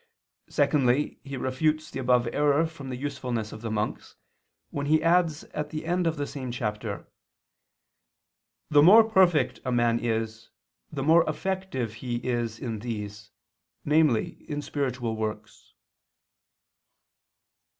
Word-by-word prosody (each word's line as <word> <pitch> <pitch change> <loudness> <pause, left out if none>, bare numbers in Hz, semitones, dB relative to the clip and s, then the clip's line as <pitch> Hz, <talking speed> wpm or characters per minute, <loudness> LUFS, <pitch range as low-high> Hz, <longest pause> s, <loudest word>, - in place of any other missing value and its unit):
Secondly, 135 0 +2
he 135 -1 -6
refutes 155 +5 -1
the - - -5
above 125 -1 +2
error 145 +2 +3
from 160 -5 -8
the 130 - -3
usefulness 125 -5 -3
of 110 - -9
the 115 - -4
monks, 110 -1 -3 0.6
when 145 0 -3
he 155 +1 +3
adds 165 -2 +2
at 150 0 -3
the 155 +1 -5
end 175 +1 +1
of 165 -1 -1
the 145 - -1
same 135 -3 -6
chapter: 105 -3 -4 1.7
"The 145 -1 +7
more 205 +9 +9
perfect 190 -7 +3
a 130 - -2
man 120 -1 +2
is, 110 -1 -3 0.4
the 140 -3 -3
more 165 +3 +6
effective 155 - -3
is 120 -2 -2
he - - -11
in 115 -3 -3
these, 105 -2 -6 0.6
namely 150 0 +2
in 145 -1 -3
spiritual 125 -6 -2
works." 110 -1 -6
135 Hz, 130 wpm, -27 LUFS, 115-155 Hz, 1.7 s, more